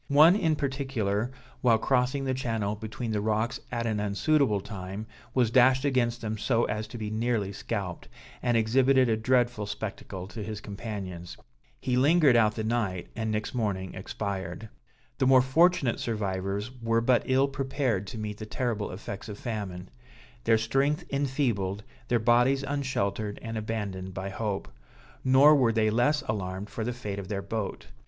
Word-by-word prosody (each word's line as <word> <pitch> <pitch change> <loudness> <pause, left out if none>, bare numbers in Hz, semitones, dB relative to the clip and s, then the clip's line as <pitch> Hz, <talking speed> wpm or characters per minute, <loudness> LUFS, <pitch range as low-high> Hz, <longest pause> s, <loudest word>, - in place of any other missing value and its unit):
One 155 +6 +7
in 165 -7 +2
particular, 130 -7 -1 0.3
while 115 -3 +5
crossing 130 +3 +1
the 130 - 0
channel 115 -5 -1
between 110 +2 -5
the 105 -1 0
rocks 110 +3 0
at 120 -1 -2
an 110 -2 0
unsuitable 105 +3 +2
time, 95 +1 -6 0.3
was 120 -4 +3
dashed 130 +2 +5
against 120 -4 +1
them 110 -1 -3
so 120 +1 +2
as 105 0 -3
to 115 - -8
be 105 -1 -4
nearly 110 -3 0
scalped, - - -4 0.3
and 120 -1 +2
exhibited 130 +3 +4
a 110 - +3
dreadful 120 -2 +1
spectacle 100 -2 -5
to 110 - -7
his 110 0 -5
companions. 100 -4 -6 0.4
He 125 - 0
lingered 145 0 +5
out 110 -2 +4
the 110 - -2
night, 110 -6 -1
and 110 -1 -2
next 110 +3 -2
morning 100 -6 -2
expired. 100 +3 -5 0.5
The 130 - +3
more 130 -1 +7
fortunate 145 -2 +3
survivors 100 0 -2
were 115 0 +2
but 120 +1 +3
ill 130 +1 +3
prepared 135 -7 -1
to 115 - -7
meet 105 -1 -5
the 110 - -6
terrible 115 -3 -2
effects 100 +3 -7
of 105 - -6
famine; 100 -7 -5 0.5
their 115 0 +5
strength 135 +7 +1
enfeebled, 125 -8 0 0.2
their 120 - +3
bodies 120 +4 +3
unsheltered 110 -7 -2
and 115 -1 -5
abandoned 105 -4 -4
by 95 +1 -4
hope. 100 0 -3 0.6
Nor 135 +3 +7
were 125 -5 +4
they 110 -1 +2
less 145 +7 +2
alarmed 95 -1 -4
for 110 - -3
the 120 - -1
fate 105 -5 -5
of 95 - -7
their 100 -1 -3
boat. 105 0 -4
115 Hz, 165 wpm, -28 LUFS, 105-130 Hz, 0.6 s, One